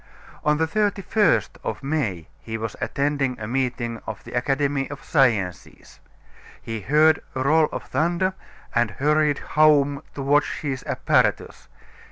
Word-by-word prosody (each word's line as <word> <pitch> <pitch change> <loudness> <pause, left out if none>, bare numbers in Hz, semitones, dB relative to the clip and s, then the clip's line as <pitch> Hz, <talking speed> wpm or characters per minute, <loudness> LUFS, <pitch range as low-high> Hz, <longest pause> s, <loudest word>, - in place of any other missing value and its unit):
On 150 0 +2
the 160 - +2
31st 205 +2 +1
of - - -4
May 130 - -2
he 110 +8 -5
was 110 -1 -5
attending 140 -3 -1
a 105 - -5
meeting 120 -2 -2
of 110 -2 -6
the - - -11
Academy 135 +2 0
of 140 -1 -8
Sciences. 110 - 0 0.6
He 115 -1 -6
heard 150 +7 +4
a 130 - -1
roll 155 +3 +3
of - - -5
thunder 175 +4 0 0.4
and 120 -1 +2
hurried 150 +6 +1
home 145 -2 +3
to 140 - -4
watch 145 +2 +1
his 135 -4 -3
apparatus. - - 0
140 Hz, 140 wpm, -23 LUFS, 120-155 Hz, 0.6 s, heard